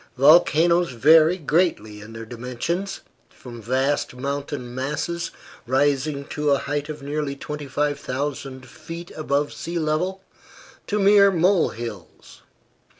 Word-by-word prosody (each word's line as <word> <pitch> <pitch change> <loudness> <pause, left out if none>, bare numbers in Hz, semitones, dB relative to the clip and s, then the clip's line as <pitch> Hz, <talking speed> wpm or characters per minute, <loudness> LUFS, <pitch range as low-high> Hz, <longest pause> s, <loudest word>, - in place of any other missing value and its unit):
Volcanoes 170 +2 +5
vary 155 +7 +5
greatly 150 - 0
in 110 +2 -11
their 115 0 -7
dimensions, 125 - -4 0.3
from 120 -2 -11
vast 130 +4 0
mountain 140 -1 -4
masses, 150 +6 -3 0.4
rising 140 +2 +1
to 150 0 -1
a 140 - +4
height 145 +2 -3
of 150 -2 -7
nearly 145 0 -3
25,000 140 -2 -4
feet 165 +2 -9
above 145 -1 -1
sea 170 +1 -5
level, 170 +5 -1 0.6
to 210 - -1
mere 200 0 +6
molehills. 160 - -1
145 Hz, 110 wpm, -23 LUFS, 130-165 Hz, 0.6 s, mere